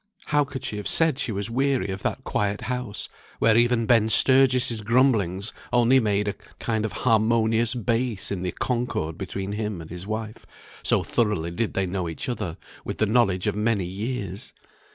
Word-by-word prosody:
How 145 0 +2
could 140 -1 -7
she 105 - -3
have 105 - -3
said 160 -5 +3
she 140 - -1
was 100 +2 0
weary 130 -5 0
of 95 0 -5
that - - -3
quiet 105 0 -1
house, 125 -4 -3 0.3
where 110 -1 +3
even 120 0 +3
Ben 110 -1 +3
Sturgis' 130 -1 +5
grumblings 105 -4 +1 0.2
only 120 +2 +4
made 105 -3 0
a 100 - 0 0.2
kind 110 -2 -1
of 110 - -3
harmonious 115 +1 +3
bass 115 -2 -1
in 95 -3 -3
the 90 -1 -2
concord 120 -11 -2
between 95 +2 -5
him 105 -3 -3
and 80 -1 -10
his 90 +2 -5
wife, 110 0 -5 0.4
so - - +1
thoroughly 105 -8 -1
did 110 +6 -3
they 95 - +1
know 90 -1 -3
each 80 - -6
other 105 -9 -4 0.3
with - - -5
the 110 - +2
knowledge 105 -5 +2
of - - 0
many 105 -3 0
years! 100 0 -5
110 Hz, 180 wpm, -24 LUFS, 100-120 Hz, 0.4 s, Sturgis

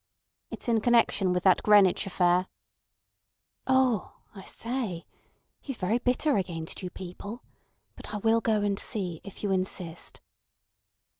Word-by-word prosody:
"It's - - -7
in 230 -2 +2
connection 230 -5 +3
with 180 -1 0
that 190 -2 +5
Greenwich 205 -3 +5
affair." 180 -1 +2 1.2
"Oh! 260 -6 +2 0.2
I 195 - -10
say! 230 -8 -4 0.5
He's 270 -4 -6
very 210 +6 0
bitter 255 +3 +1
against 170 -4 -3
you 180 - -4
people. 190 +6 -8 0.5
But - - -9
I 210 - -3
will 225 +2 +2
go 215 -2 +1
and 200 -1 0
see, 180 -6 -3
if 200 +1 -10
you 205 - 0
insist." 185 -3 -3
200 Hz, 135 wpm, -28 LUFS, 180-230 Hz, 1.2 s, that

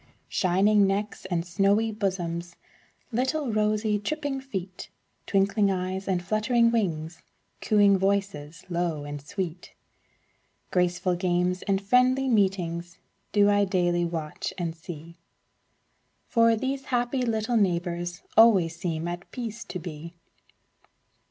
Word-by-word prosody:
Shining 200 +2 +3
necks 205 +2 -2
and 170 -2 -1
snowy 200 +5 +2
bosoms, 175 -5 -3 0.6
Little 260 +2 -1
rosy, 210 0 +1
tripping 285 +4 -3
feet, 190 -8 -6 0.4
Twinkling 200 +1 +2
eyes 190 0 -2
and 180 -2 0
fluttering 230 +3 +2
wings, 170 -7 -2 0.4
Cooing 205 -3 +4
voices, 190 -5 -1
low 170 -4 -2
and 145 0 -6
sweet, 175 +3 -6 1.0
Graceful 180 0 +1
games 180 0 0
and 195 -2 0
friendly 250 +6 +3
meetings, 180 -6 0 0.3
Do 205 -1 +4
I 205 0 +3
daily 175 -3 +1
watch 165 -3 -4
and 170 -3 -3
see. 165 0 -10 1.1
For 230 -1 +4
these 265 +4 -3
happy 245 +1 0
little 230 0 0
neighbors 175 -2 -1
Always 195 -8 +6
seem 170 -2 -3
at 175 0 -6
peace 230 -2 -6
to - - -5
be. 170 -1 -8
195 Hz, 115 wpm, -26 LUFS, 175-215 Hz, 1.1 s, Always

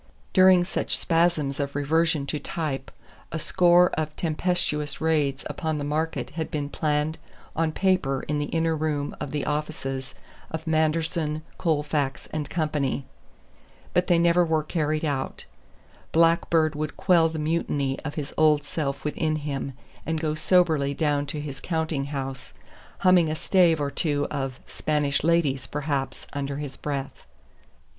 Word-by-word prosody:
During 185 -2 +7
such 175 - -1
spasms 165 -4 +1
of 140 0 -2
reversion 155 +1 +1
to 150 +2 -2
type 145 -6 -3 0.4
a 160 - -2
score 175 +2 +4
of 155 -1 -2
tempestuous 160 -2 -1
raids 150 -4 +1
upon 160 -3 -2
the 145 - -3
market 155 +3 -2
had 160 -1 -4
been 145 -2 -3
planned 150 +1 0 0.4
on 160 0 +1
paper 180 -7 +1
in 150 0 0
the 145 - -1
inner 165 +1 +1
room 150 -2 -2
of - - -3
the 145 0 -2
offices 145 -3 -3 0.3
of 160 0 -5
Manderson, 160 0 0 0.2
Colefax 150 -4 0
and 155 -2 -2
Company. 150 -5 -1 0.9
But 180 0 +2
they 175 - +4
were 170 - +3
never 170 -2 +3
carried 155 -1 -1
out. 140 -3 -3 0.7
Blackbeard 165 -1 +3
would 150 0 -4
quell 170 -3 +4
the 160 - -5
mutiny 150 -3 -1
of 145 -2 -6
his 145 -2 -4
old 150 -2 +4
self 140 -2 -3
within 155 +1 0
him 140 -2 -3 0.3
and 160 -1 -1
go 155 -1 0
soberly 155 -4 +2
down 145 -2 +1
to 150 +2 -4
his 140 -2 -6
counting 160 -4 -1
house 135 -2 -5 0.5
humming 185 -4 +5
a 155 - -1
stave 170 -1 +3
or 140 -1 -1
two 145 -3 0
of 135 -3 -3
"Spanish 145 -2 0
Ladies," 160 -5 +2
perhaps, 140 -2 -3
under 140 -1 -3
his 145 -2 -5
breath. 140 -2 -5
155 Hz, 150 wpm, -26 LUFS, 145-165 Hz, 0.9 s, During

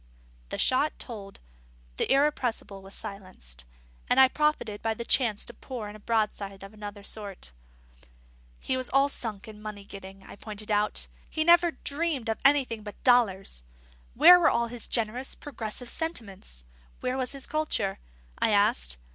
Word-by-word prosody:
The - - -4
shot 275 +4 +3
told; 200 -5 -7 0.6
the - - 0
Irrepressible 265 -8 +1
was 195 +1 -8
silenced; 185 - -8 0.4
and - - +4
I 265 -1 +8
profited 300 -9 0
by 225 0 0
the 235 - -6
chance 230 -6 +3
to 240 - -7
pour 240 -5 -7
in 210 - -10
a - - -11
broadside 205 -3 -1
of 195 +2 -10
another 205 -1 -8
sort. 200 - -4 1.1
He 260 - -1
was 255 -1 -2
all 275 +1 +4
sunk 220 -7 -4
in 210 -1 -11
money 210 -2 -7
getting, 195 -1 -10
I - - -12
pointed 215 0 -7
out; 210 0 +1 0.2
he 315 - 0
never 345 +1 +6
dreamed 290 -6 -2
of 220 - -1
anything 270 -5 +3
but 205 -1 -10
dollars. 200 - +3 0.5
Where 360 0 +9
were 330 - +5
all 235 0 +1
his 240 -1 -3
generous, 235 +3 0
progressive 245 -4 -3
sentiments? 200 - -4 0.4
Where 255 0 -1
was 260 0 -1
his 275 -1 -5
culture? 305 -11 -1 0.4
I - - +3
asked. 60 - +2
220 Hz, 160 wpm, -28 LUFS, 200-260 Hz, 1.1 s, Where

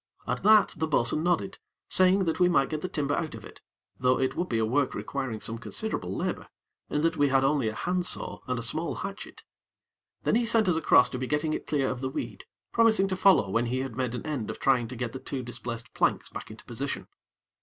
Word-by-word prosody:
At 125 +1 -2
that, 215 +2 +5
the 160 0 -1
bo'sun 140 -1 +1
nodded, 170 - 0 0.3
saying 185 +1 +4
that 165 -1 -1
we 180 0 +5
might 140 -5 +2
get 155 -1 -2
the 185 - -3
timber 145 -5 -1
out 160 0 -2
of - - -10
it, - - -13 0.4
though 130 0 +3
it 130 - 0
would 180 - -2
be 115 - 0
a 110 - +2
work 130 +4 +1
requiring 135 -6 -4
some 115 +2 -4
considerable 105 - -3
labor, - - -3 0.4
in 150 - 0
that 165 - +1
we 145 - +4
had 135 0 +3
only 135 -3 +2
a 110 - -3
hand 180 +5 -1
saw - - -2
and 125 0 -1
a 115 - -3
small 160 +8 -1
hatchet. 195 +1 -7 0.8
Then - - +1
he 235 0 +2
sent 225 -3 +3
us 180 - +3
across 160 -5 +5
to 125 - -4
be 130 - -3
getting 150 +2 0
it - - -4
clear 140 -3 +1
of 125 -1 -3
the 130 - -1
weed, - - -6 0.3
promising 220 -4 +4
to 185 - 0
follow 185 - +4
when 115 +3 +1
he 130 +2 -1
had 130 -4 -5
made 125 -1 -2
an - - -6
end 145 -8 -3
of - - -4
trying 125 -4 +2
to 125 - -7
get 120 -1 -4
the 130 - -5
two 130 -1 -5
displaced 120 -1 -6
planks - - +1
back - - -8
into - - -12
position. - - -4
140 Hz, 240 wpm, -28 LUFS, 125-175 Hz, 0.8 s, that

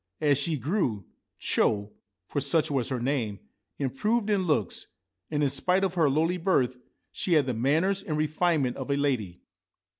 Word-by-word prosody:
As 145 -3 +3
she 155 +2 -1
grew, 130 - -1 0.3
Cho 105 0 +1 0.2
— 95 -2 -58
for 145 - -2
such 150 +3 +2
was 135 -2 0
her 130 -2 -2
name 120 -5 -1 0.2
— - - -54
improved 210 - 0
in 190 -3 +1
looks, 110 - 0 0.4
and, 150 -1 0
in 140 - +3
spite 185 +7 +1
of 190 -2 0
her 165 -5 +3
lowly 165 +6 +1
birth, 130 -9 +1 0.3
she 180 - -1
had 150 -4 +4
the 130 - -1
manners 160 - +1
and 155 -6 -3
refinement 155 -3 +1
of - - -6
a 140 - +1
lady. 120 -11 -1
145 Hz, 180 wpm, -27 LUFS, 125-170 Hz, 0.4 s, had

